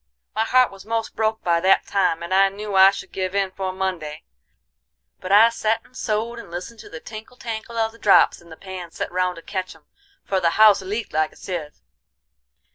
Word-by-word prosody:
"My 220 - 0
heart 255 +1 +4
was 195 -1 -12
most 225 0 -3
broke 220 0 -1
by 170 -1 +2
that 190 +3 +3
time, 180 -4 0
and 170 +2 -4
I 195 +1 +5
knew 205 +1 -7
I 190 0 +8
should 195 - -7
give 185 0 -3
in 195 -1 0
'fore 190 0 -4
Monday. 185 -5 -4 1.0
But 185 - -6
I 215 +3 +7
set 225 -1 -1
and 255 - -23
sewed 230 0 -2
and 235 - -11
listened 180 +7 -7
to - - -12
the 160 - -8
tinkle 220 +6 -11
tankle 230 0 -6
of 225 -1 +1
the 230 - -18
drops 200 - +4
in 170 - -18
the 160 - -11
pans 185 -3 -9
set - - -4
round 180 0 0
to 165 - -12
ketch 185 -2 -5
'em, - - -22 0.4
for 195 - 0
the 170 -2 +2
house 215 -2 +7
leaked 210 +4 -5
like 155 0 0
a - - -21
sieve. 165 -6 -7
195 Hz, 215 wpm, -22 LUFS, 185-220 Hz, 1.0 s, I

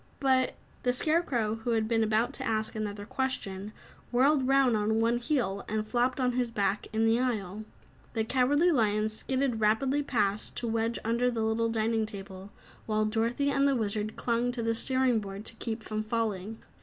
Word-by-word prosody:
"But 260 -2 +2
" - - -30
The 245 - +1
Scarecrow, 250 -7 +1
who 235 - 0
had 220 -1 +1
been 225 -1 +2
about 220 +4 +1
to 265 - -5
ask 220 -2 -1
another 205 -1 -4
question, 210 -6 -3 0.4
whirled 265 +2 +3
round 270 -3 +4
on 215 +1 +1
one 230 +1 +2
heel, 235 -7 -1
and 215 0 -1
flopped 250 +3 +1
on 250 -1 +2
his 245 -1 0
back 205 -2 -1
in 220 +1 +1
the 225 +1 +3
aisle. 215 -5 -2 0.5
The 225 - 0
Cowardly 275 +8 +3
Lion 215 -5 +2
skidded 255 +2 -1
rapidly 260 +7 +2
past, 210 -7 -1
to 240 - -1
wedge 225 +1 0
under 235 +2 +2
the 230 -2 -1
little 225 +1 +1
dining 225 0 0
table 195 -1 -9 0.4
while 215 -1 +1
Dorothy 230 +6 0
and 275 0 +3
the 275 - +2
Wizard 215 -2 -2
clung 240 +1 0
to 235 -2 -3
the 230 0 +1
steering 255 0 +2
board 200 0 -7
to - - -5
keep 225 -1 -4
from 215 0 -3
falling. 215 -2 -2
225 Hz, 185 wpm, -29 LUFS, 215-250 Hz, 0.5 s, round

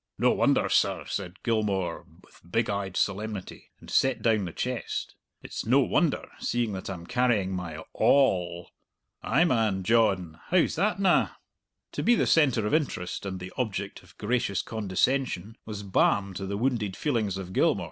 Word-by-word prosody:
"No - - +4
wonder, - - +2
sir," - - +1
said 95 -1 -5
Gilmour, 100 -7 -1 0.2
with - - -21
big 115 0 +1
eyed 100 -2 -3
solemnity, 105 -1 -3
and - - -15
set 135 -1 +1
down 110 -4 +2
the 85 - -5
chest; 125 +7 -3 0.3
"it's - - -5
no 125 +7 +4
wonder, 155 +3 +1
seeing 120 -2 -1
that 95 0 -5
I'm 90 -3 -6
carrying 120 -6 +1
my 90 -3 -4
a 80 +1 -8
all." 90 -11 +2 0.5
"Ay, - - +3
man, 110 - +1
John. 95 -7 +2
How's 180 -1 +3
that 195 +4 0
na?" 190 -3 +3 0.6
To - - -3
be 240 - +4
the - - +2
centre 135 -9 +3
of 105 - -1
interest 115 - -1
and 95 -1 -4
the 90 +1 -8
object 100 -5 -3
of - - -21
gracious 110 -2 0
condescension 110 0 -1
was 105 -2 -5
balm 100 0 +2
to 95 +1 -5
the 100 +1 -3
wounded 115 -5 -1
feelings 110 - 0
of 95 -1 -7
Gilmour. - - +3
105 Hz, 170 wpm, -27 LUFS, 95-125 Hz, 0.6 s, No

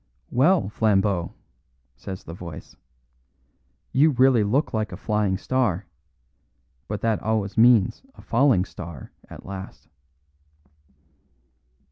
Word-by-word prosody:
"Well, 155 - +3
Flambeau," 100 -5 +1 0.6
says 95 +9 -8
the 80 - -9
voice, 85 -3 -10 1.2
"you 145 +4 +4
really 130 -4 +4
look 130 +9 0
like 110 -2 -1
a 90 - -7
Flying 105 -2 0
Star; 115 -6 -1 1.0
but 105 -1 -4
that 115 -2 0
always 105 -2 -1
means 115 -3 +4
a - - -14
Falling 120 -6 +3
Star 85 -6 -10 0.2
at - - -11
last." 95 0 -9
105 Hz, 105 wpm, -24 LUFS, 95-120 Hz, 1.2 s, you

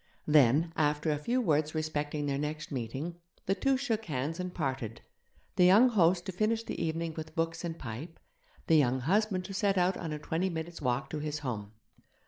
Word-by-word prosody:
Then, 150 +2 +4
after 150 0 +1
a 150 - -1
few 240 +12 0
words 155 -5 +1
respecting 150 -1 -2
their 140 -1 -1
next 155 +1 -4
meeting, 135 +7 -4 0.3
the 195 - +2
two 270 +6 +2
shook 225 -5 -1
hands 150 0 -3
and 180 0 -3
parted 130 -8 -3 0.6
the 180 - +6
young 210 +8 +7
host 175 -5 +3
to 190 - -3
finish 220 +4 0
the 200 - -4
evening 165 0 -2
with 160 0 -7
books 165 +1 -1
and 170 -1 -4
pipe, 135 +7 -7 0.5
the 160 - +5
young 130 -3 +3
husband 190 - +1
to 195 - -6
set 195 0 +1
out 180 +1 +2
on 165 -3 -4
a 150 - -2
twenty 165 +5 -1
minutes' 165 0 -5
walk 125 0 -1
to 155 - -3
his 150 0 -3
home. 105 -4 -4
160 Hz, 195 wpm, -31 LUFS, 145-180 Hz, 0.6 s, young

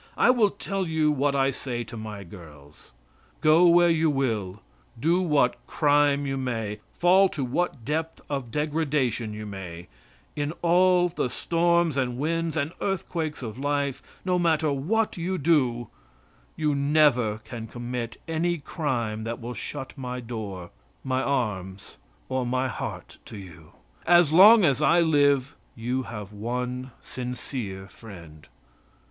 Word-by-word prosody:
I - - +5
will 230 -5 +3
tell 195 -1 -4
you 160 -1 +2
what 140 0 +1
I 135 0 +2
say 120 -2 -4
to 115 - -10
my 105 -2 -7
girls: 75 -6 -14 0.5
"Go 160 +3 +5
where 175 0 +6
you 160 -1 +2
will; 110 -9 -2 0.4
do 170 +7 +2
what 150 -8 +2
crime 145 -1 +2
you 135 0 -2
may; 115 -5 -3 0.2
fall 185 +2 +5
to 140 -6 -3
what 130 -2 -2
depth 160 +2 -2
of 135 -4 -4
degradation 145 -6 -1
you 105 0 -7
may; 90 -5 -8 0.5
in 145 +1 -2
all 180 +1 +4
the 170 -7 -2
storms 170 0 +1
and 125 -2 -1
winds 165 +3 -1
and 150 +1 -1
earthquakes 165 -6 -3
of 115 +1 -6
life, 140 -1 -1 0.2
no 180 -1 +1
matter 160 -3 +2
what 210 +12 0
you 180 +2 -2
do, 130 -7 +1 0.7
you 150 -2 0
never 140 -6 +3
can 115 -2 -7
commit 120 0 -5
any 170 +2 0
crime 120 -8 -3
that 115 +1 -4
will 120 +1 -6
shut 130 +3 -6
my 125 -2 -5
door, 105 -7 -6 0.3
my 130 0 0
arms 105 -9 -3 0.3
or 130 0 -1
my 130 +2 0
heart 120 - -6
to - - -9
you. 85 -5 -13 0.3
As 175 -3 +5
long 205 +4 +8
as 140 -2 +2
I 160 +4 +4
live 145 -4 +2 0.2
you 125 +3 -2
have 105 -2 -7
one 125 +4 -4
sincere 120 -6 -6
friend." 85 -9 -13
135 Hz, 145 wpm, -26 LUFS, 115-160 Hz, 0.7 s, long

